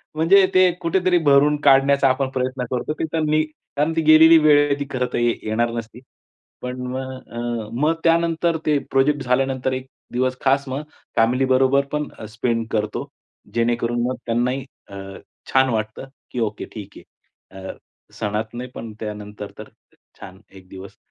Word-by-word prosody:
म्हणजे 190 +5 +5
ते 185 -1 +5
कुठेतरी 180 +1 +2
भरून 145 +1 +5
काढण्याचा 140 -1 +5
आपण 130 +1 0
प्रयत्न 130 -1 -2
करतो. 125 +4 -2
ते 155 - -5
त्यांनी 155 -1 +1
कारण 155 0 -4
ती 165 - +2
गेलेली 160 +1 +7
वेळ 145 -1 +7
आहे 140 - +1
ती 140 - -2
खरं 125 -1 0
तर - - 0
येणार 115 0 0
नसती. 115 0 -7 0.6
पण 125 0 -5
मग 130 +1 -4 0.2
अ, 120 -2 -4
मग 150 +6 +2
त्यानंतर 165 0 +2
ते 150 -1 +3
प्रोजेक्ट 140 +1 +2
झाल्यानंतर 130 +1 0
एक 130 0 -5 0.3
दिवस 130 +1 0
खास 135 +1 +2
मग 135 +3 -4 0.3
फॅमिलीबरोबर 130 +3 +3
पण 150 0 -2 0.2
स्पेंड 115 0 -2
करतो. 105 -1 -2 0.5
जेणेकरून 120 0 0
मग 130 - -2
त्यांनाही 125 +3 -1 0.2
अ, 100 - -10 0.6
छान 130 0 +4
वाटतं, 110 +2 -3 0.2
की 125 - -4
ओके 110 -2 -2
ठीक 105 -3 -9
आहे. 95 0 -15
अ, - - -6 0.4
सणात 110 +2 -3
नाही 125 +1 -6
पण 115 -1 -7
त्यानंतर 105 -1 -7
तर - - -10 0.5
छान 95 +2 -12
एक 95 -1 -15
दिवस 95 0 -11
130 Hz, 155 wpm, -21 LUFS, 115-145 Hz, 0.6 s, गेलेली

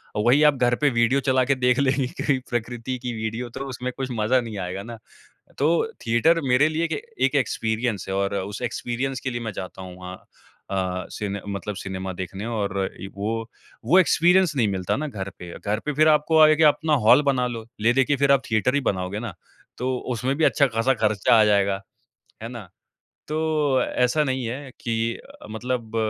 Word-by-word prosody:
और 105 - 0
वही 135 +5 +5
आप 150 - +5
घर 120 -2 +2
पे 145 - +4
वीडियो 120 +2 +2
चला 130 -1 +2
के 140 - +2
देख 125 0 +2
लेंगे 135 -1 +2
कहीं 140 -3 +1
प्रकृति 120 +1 -3
की 125 - -2
वीडियो, 110 +2 -4
तो 135 +4 -6
उसमें 125 0 -4
कुछ 135 - -2
मज़ा 115 +3 +2
नहीं 115 -3 -7
आएगा 95 +1 -4
ना, 115 0 -8 0.6
तो 165 +9 +1
थिएटर 120 +9 +3
मेरे 125 +4 +4
लिए 160 +1 -1
एक - - -3 0.3
एक 135 +2 +2
एक्सपीरियंस 110 -5 -1
है 95 - -1
और 100 +1 0
उस 100 +4 -4
एक्सपीरियंस 125 +2 -3
के 130 - -3
लिए 120 -1 -4
मैं 110 -2 -4
जाता 95 0 -7
हूँ 90 -1 -9
वहाँ। 90 0 -8 0.5
अ, 95 -1 -2
सिने 100 -1 -4
मतलब 100 +1 -4
सिनेमा 95 -1 -5
देखने 95 +3 -6
और 100 -4 -1 0.2
एक 95 - -7
वो 115 +3 -3 0.4
वो 180 +9 +6
एक्सपीरियंस 180 0 +4
नहीं 120 -5 +2
मिलता 95 -2 -1
ना 155 - -3
घर 100 -8 -5
पे। 90 -1 -8
घर 105 +1 -2
पे 150 - -1
फिर 155 +2 +4
आपको 155 +1 +4
आयेगा 155 0 +6
अपना 155 +1 +1
हॉल 145 - +8
बना 130 -3 +1
लो, 115 -2 -6
ले 115 +3 +3
दे 135 +1 +4
के 145 - +1
फिर 140 0 +2
आप 140 -1 +4
थिएटर 110 +4 +2
ही 145 - +2
बनाओगे 95 +1 -4
ना? 110 -5 -5 0.4
तो 125 +1 -1 0.2
उसमें 125 +4 -1
भी 160 - 0
अच्छा-खासा 135 -4 +3
खर्चा 110 -1 +3
आ - - +7
जाएगा, 100 -1 +2 0.6
है 115 - -5
ना? 115 -6 -9 0.6
तो 155 -4 +1
ऐसा 125 +6 +1
नहीं 130 -2 -2
है 135 +3 -6
कि 115 0 -1
अ, - - -15
मतलब 115 0 -4
120 Hz, 200 wpm, -24 LUFS, 105-135 Hz, 0.6 s, हॉल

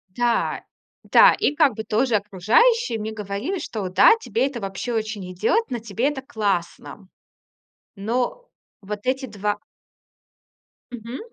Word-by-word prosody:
Да, 240 -1 0 0.4
да, - - +6
и 290 - +1
как 295 -4 +3
бы 220 - -5
тоже 225 +2 +1
окружающие 225 - +2
мне 215 +1 -4
говорили, 215 - -4
что 210 -9 -4
да, 195 - +6
тебе 240 - 0
это 265 -4 -6
вообще 195 +4 -4
очень 215 -4 -3
идёт, 445 - 0
на 240 - -2
тебе 225 +5 -1
это 275 -3 -5
классно. 200 -5 -3 0.9
Но 240 - -2 0.3
вот 205 +1 -6
эти 265 +1 0
2 210 -2 -3 1.3
Мгм. 240 +1 -7
225 Hz, 130 wpm, -23 LUFS, 205-265 Hz, 1.3 s, да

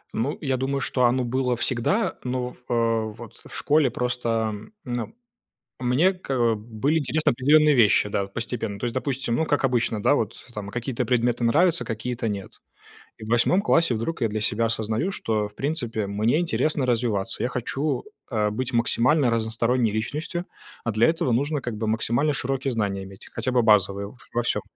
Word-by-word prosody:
Ну, 140 +8 -1
я 135 -4 0
думаю, 135 +1 -1
что 130 - -1
оно 125 +2 +2
было 125 +1 0
всегда, 130 - 0
но, 125 0 -2 0.2
а, - - 0 0.4
вот, 115 -2 -12
в - - -10
школе 150 -3 +3
просто, 125 0 -2
а, 110 -1 0 0.3
ну, 120 -2 -4 0.7
мне, 130 +10 +3
к 180 -6 -9
э, 120 -3 +3
были 115 +8 -1
интересны 155 +2 +1
определенные 150 +4 +4
вещи 105 -3 +4
да, 100 - 0
вот, 100 0 -10
постепенно. 115 -3 -3
То 120 - -3
есть, 120 - -2
допустим, 130 -2 -1
ну, 160 - +1
как 145 -2 0
обычно, 120 -4 0
да, - - +4
вот, 110 -7 -1 0.2
там, 105 -1 -6
какие-то 125 +2 -3
предметы 120 0 +1
нравятся, 165 +9 +3
какие-то 115 +1 -3
нет. 100 -3 -6 0.6
И 110 - -8
в - - -8
8 120 - +3
классе 165 -9 +3
вдруг 120 +8 -3
я 115 - +3
для 110 0 -3
себя 105 +2 +1
осознаю, 110 - -1
что, 110 - -1
в 105 - -20
принципе, 120 -8 -2
мне 110 +8 +1
интересно 155 -4 0
развиваться. 115 -5 0
Я 120 - 0
хочу, 135 +4 -2 0.3
э, 105 -2 +1
быть 125 +4 -3
максимально 125 +4 +3
разносторонней 115 +1 +1
личностью. 155 - -3 0.4
А 115 - -1
для 110 +2 +3
этого 160 -6 +1
нужно, 145 +5 0
как 120 -3 -4
бы 110 +1 -3
максимально 120 +6 +1
широкие 135 0 -2
знания 100 -4 -1
иметь, 95 0 -12
хотя 130 - -2
бы 125 - +3
базовые, 100 -2 +3
в 115 - -14 0.2
во 120 - +1
всём. 120 - 0
120 Hz, 185 wpm, -24 LUFS, 110-135 Hz, 0.7 s, определенные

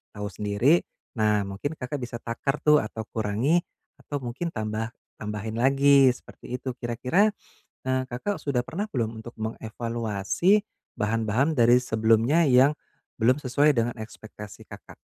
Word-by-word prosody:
tahu 105 0 -4
sendiri, 105 - +2 0.4
nah 105 -1 +3
mungkin 105 +11 -4
Kakak 130 +2 -4
bisa 120 -1 -6
takar 120 +5 -2
tuh 150 0 +6
atau 110 +1 -6
kurangi, 110 +10 +1 0.4
atau 145 - -4
mungkin 135 +8 -4
tambah 110 +1 -3 0.3
tambahin 105 +1 -4
lagi 135 +1 +5
seperti 125 0 -9
itu. 130 - -4
Kira 120 -1 -3
kira, 195 - +3 0.6
eee, 130 0 +1
Kakak 160 +12 -3
sudah 140 -4 0
pernah 180 +10 -3
belum 115 -3 -2
untuk 110 +2 -9
mengevaluasi 115 - 0 0.4
bahan-bahan 115 +7 0
dari 120 0 +5
sebelumnya 115 +7 +3
yang 130 +3 +6 0.5
belum 125 +4 +4
sesuai 145 +3 +3
dengan 120 +1 0
ekspektasi 110 -2 -10
Kakak? - - -12
120 Hz, 140 wpm, -26 LUFS, 110-140 Hz, 0.6 s, tuh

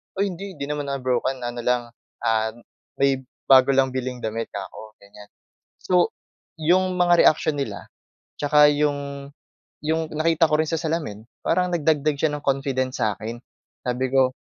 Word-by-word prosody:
"Ay, 200 0 0
hindi 195 +2 -8
hindi 140 - -6
naman 145 0 -3
ako 140 0 -2
broken 130 +1 0
ano 120 0 -4
lang, 125 0 +1 0.4
ah, 110 -1 +1 0.4
may 135 -1 +2 0.3
bago 130 0 +7
lang 130 -1 +3
biling 125 -1 -4
damit." 115 +1 -3
'kako 105 +2 -9
ganyan. 105 +1 -14 0.5
So, 180 -1 +2 0.5
yung 180 +3 +2
mga 175 -1 +5
reaksyon 155 0 +3
nila 100 -7 -6 0.5
tsaka 150 0 +5
yung 145 -1 -2 0.6
yung 160 +1 0
nakita 165 +1 +3
ko 155 - +1
rin - - -6
sa 165 - -1
salamin, 155 -10 -3 0.2
parang 180 0 +2
nagdagdag 155 -3 +1
siya 150 +2 0
ng 150 - -3
confidence 135 -2 -1
sa 105 -2 +1
akin 115 +2 -5 0.5
sabi 125 +1 -1
ko, 130 -1 +4
140 Hz, 160 wpm, -23 LUFS, 125-160 Hz, 0.6 s, bago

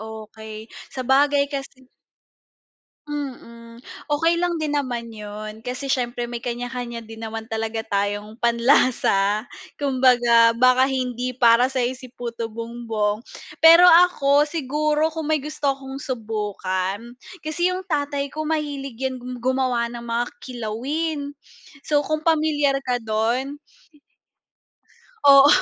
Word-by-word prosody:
okey, 220 0 -9 0.3
sabagay 280 +2 +3
kasi 270 -1 -7 1.2
Mm, 240 -5 -8 0.2
okey 330 +3 +2
lang 350 -1 0
din 310 -2 -2
naman 245 -5 -2
yun, 215 0 -8
kasi 255 +3 -3
siyempre 240 -1 -1
may 240 0 -5
kanya-kanya 240 -1 -5
din 225 0 -11
naman 225 0 -5
talaga 225 0 -3
tayong 205 +1 -2
panlasa, 235 -4 +3 0.3
kumbaga 245 -4 +4
baka 255 +2 +4
hindi 255 -1 -2
para 240 0 +5
sa'yo 255 -2 -1
si 255 0 -11
puto 235 -2 -5
bumbong. 225 -2 -3 0.4
Pero 330 +2 +9
ako 305 -5 +5
siguro 305 +1 0
kung 315 -1 -4
may 310 - +3
gusto 290 -1 -2
akong 270 0 -8
subukan, 210 -4 -3 0.3
kasi 345 +3 0
yung 365 +1 -3
tatay 285 -4 -2
ko 310 0 -4
mahilig 285 -5 -3
yan 260 0 -3
gu 250 +1 -7
gumawa 255 -1 0
ng 240 - -7
mga 235 0 -1 0.2
kilawin. 280 +6 -4 0.5
So 295 -1 +2
kung 310 +2 -3
pamilyar 300 -4 +2
ka 250 -2 -1
dun. 235 +6 -1 1.6
Oo, 275 -1 +8
255 Hz, 120 wpm, -22 LUFS, 230-285 Hz, 1.6 s, Pero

